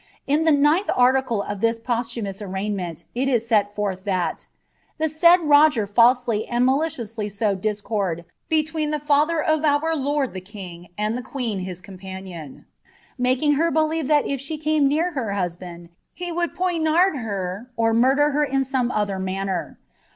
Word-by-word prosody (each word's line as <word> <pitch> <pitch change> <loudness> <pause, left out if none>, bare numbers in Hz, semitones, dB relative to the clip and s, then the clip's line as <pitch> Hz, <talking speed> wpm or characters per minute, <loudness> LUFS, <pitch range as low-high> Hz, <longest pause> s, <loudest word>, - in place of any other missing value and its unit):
In 300 +3 +1
the 320 - +5
B 265 - +3
of 205 -1 -5
this 230 0 +1
posihnmous 230 -4 -3
arraignment 190 -3 -4
it 265 +3 0
is 235 -3 +1
set 205 -3 +2
forth 195 -3 -2
that, 185 -4 -2 0.5
U 315 - +2 0.4
Roger 290 -6 +5
falsely 235 +1 +3
and 240 +1 +1
maliciously 245 -7 -1
sowed 200 -2 -1
discord 205 -5 -2 0.2
between 315 -1 0
the 300 - 0
ir 305 +1 +2
lord 285 -2 -1
the 185 - -6
king 185 -3 -10
and 210 +2 -1
the 250 - -3
queen 240 -6 -3
his 185 -1 -6
companion, 185 -5 -9 0.5
making 255 +4 +2
her 335 0 +2
I 315 0 +1 0.2
if 275 -2 -2
she 305 +3 -4
came 305 -1 +2
near 320 +6 +1
her 235 -10 -3
husband 175 -2 -5 0.3
he 355 -1 -5
would 345 0 -2
poignard 345 -1 +2
her, 200 -1 -4
or 225 0 +2 0.5
in 270 -1 +1
some 260 -2 -1
other 205 -4 -1
manner. 190 0 -3
240 Hz, 145 wpm, -23 LUFS, 200-295 Hz, 0.5 s, the